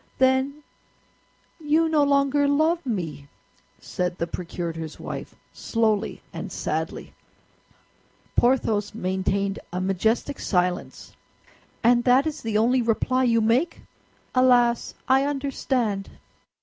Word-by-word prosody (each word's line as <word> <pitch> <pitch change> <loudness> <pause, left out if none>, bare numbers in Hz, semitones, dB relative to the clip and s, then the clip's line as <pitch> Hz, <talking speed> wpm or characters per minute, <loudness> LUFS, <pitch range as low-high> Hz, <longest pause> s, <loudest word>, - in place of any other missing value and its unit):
"Then 265 +3 +2 1.0
you 315 +1 +2
no 315 -2 +2
longer 280 0 +3
love 315 +4 +2
me!" 160 - -4 0.5
said 180 0 -3
the 170 - -1
procurator's 170 -2 -5
wife, - - -7 0.2
slowly 220 -2 -1
and - - -6
sadly. - - -4 1.2
Porthos 225 -5 +1
maintained 195 0 -1
a 180 - -3
majestic 220 +9 0
silence. 180 -2 -2 0.7
"And 240 +1 +4
that 255 +3 +5
is 310 -1 -3
the 220 -2 -1
only 245 +4 +3
reply 255 +3 +1
you 230 -2 +3
make? 245 +10 +1 0.5
Alas, 245 -2 +3
I 265 +1 +4
understand." 265 -7 -1
240 Hz, 105 wpm, -24 LUFS, 195-275 Hz, 1.2 s, that